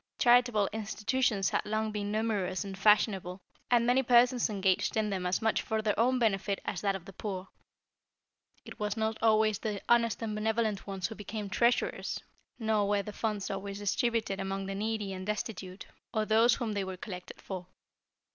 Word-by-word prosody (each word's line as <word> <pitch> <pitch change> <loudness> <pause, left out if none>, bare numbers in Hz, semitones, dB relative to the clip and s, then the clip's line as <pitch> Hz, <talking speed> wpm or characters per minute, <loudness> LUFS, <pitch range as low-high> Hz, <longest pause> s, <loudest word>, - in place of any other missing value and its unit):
Charitable 240 -4 +4
institutions 220 -1 0
had - - +1
long 215 +1 -1
been 205 -1 -3
numerous 210 -4 -1
and 195 -1 -6
fashionable, 195 -2 +3 0.3
and 240 -1 +4
many 250 +2 +4
persons 245 -1 +4
engaged 195 0 +1
in 215 -1 +1
them 185 -2 -1
as 185 +5 0
much 220 - +2
for 220 -1 -2
their 210 -1 +2
own 255 +3 +3
benefit 200 -4 +1
as 190 - -3
that 200 -1 +1
of 185 -3 -7
the 195 - -11
poor. 190 -1 -5 1.2
It - - -11
was 210 +1 -2
not 220 0 -1
always 215 -2 +3
the 210 -3 -3
honest 235 -2 +3
and 220 -1 -2
benevolent 215 -1 -1
ones 195 -2 -3
who 220 - -2
became 210 -1 -6
treasurers, 235 +3 +1 0.4
nor 220 -3 +1
were 205 -1 +2
the 210 - -7
funds 210 -2 -2
always 195 0 -4
distributed 215 0 0
among 195 0 -3
the 195 - -4
needy 210 -1 -2
and 185 0 -6
destitute, 195 -2 -4 0.3
or 215 -1 0
those 225 +3 +5
whom 230 -4 -3
they 200 -1 -1
were 190 -1 -5
collected 180 -1 -8
for. 185 -2 -7
210 Hz, 180 wpm, -31 LUFS, 195-225 Hz, 1.2 s, those